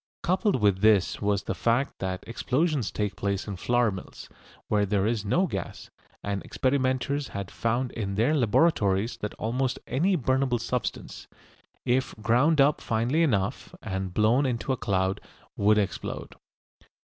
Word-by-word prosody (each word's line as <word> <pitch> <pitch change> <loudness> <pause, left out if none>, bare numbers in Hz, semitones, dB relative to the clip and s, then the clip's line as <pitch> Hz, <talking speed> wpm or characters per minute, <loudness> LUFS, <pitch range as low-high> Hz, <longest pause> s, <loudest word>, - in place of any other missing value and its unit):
Coupled 185 -1 +1
with 100 -3 +2
this 105 -6 +3
was 100 -1 +1
the - - -2
fact 120 +4 0
that 95 -1 -3
explosions 130 - 0
take 105 -1 -2
place 100 0 -2
in 100 - -4
flour 120 +4 +1
mills, 95 -1 -9 0.4
where 105 -1 +2
there 100 -1 +1
is 110 -2 0
no 170 - +2
gas, - - -6 0.3
and 100 -1 -2
experimenters 130 +1 0
had 100 -2 -6
found 120 +2 -1
in 100 -4 -4
their 115 +9 +2
laboratories 115 - +2
that 105 - -5
almost 125 +3 -1
any 180 +8 +1
burnable 130 -2 +1
substance, 125 +1 -4 0.6
if 130 +2 0
ground 125 +8 +3
up 140 +2 +4
finely 120 +8 0
enough 105 -12 0
and 95 -1 -3
blown 115 +6 +3
into 125 +1 -2
a - - 0
cloud, 95 -4 -1 0.3
would 105 +1 +3
explode. 100 -2 -3
115 Hz, 145 wpm, -27 LUFS, 100-130 Hz, 0.6 s, up